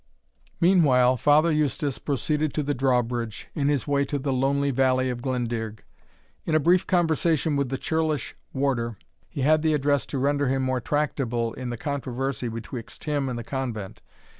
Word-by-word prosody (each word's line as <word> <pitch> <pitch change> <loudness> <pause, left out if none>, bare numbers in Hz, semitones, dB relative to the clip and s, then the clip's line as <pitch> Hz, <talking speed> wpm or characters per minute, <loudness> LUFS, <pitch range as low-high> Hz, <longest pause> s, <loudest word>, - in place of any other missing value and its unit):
Meanwhile, 135 -9 +4
Father 150 +5 +4
Eustace 150 -2 0
proceeded 150 +1 -1
to 150 - 0
the 145 +1 0
drawbridge, 120 -4 -1
in 140 -2 0
his 145 -5 0
way 140 -1 +2
to 145 +1 -2
the 135 0 -1
lonely 140 +2 +1
valley 130 0 +2
of 120 -1 -5
Glendearg. 120 -4 -3 0.6
In 155 - 0
a - - +5
brief 175 +4 +3
conversation 160 -3 +2
with 140 -2 0
the 135 - -2
churlish 155 -1 -1 0.2
warder, 125 -5 -1 0.3
he 140 - -5
had 155 +3 +4
the 155 -1 +2
address 145 -1 +1
to 140 - -4
render 140 +1 +1
him 135 +1 +1
more 130 -1 0
tractable 120 -5 -1
in 130 -1 -5
the 120 - -4
controversy 135 -2 -3
betwixt 115 +1 -7
him 145 -3 -1
and 125 - -3
the 120 - -5
convent. 115 -7 -5
135 Hz, 170 wpm, -25 LUFS, 125-150 Hz, 0.6 s, a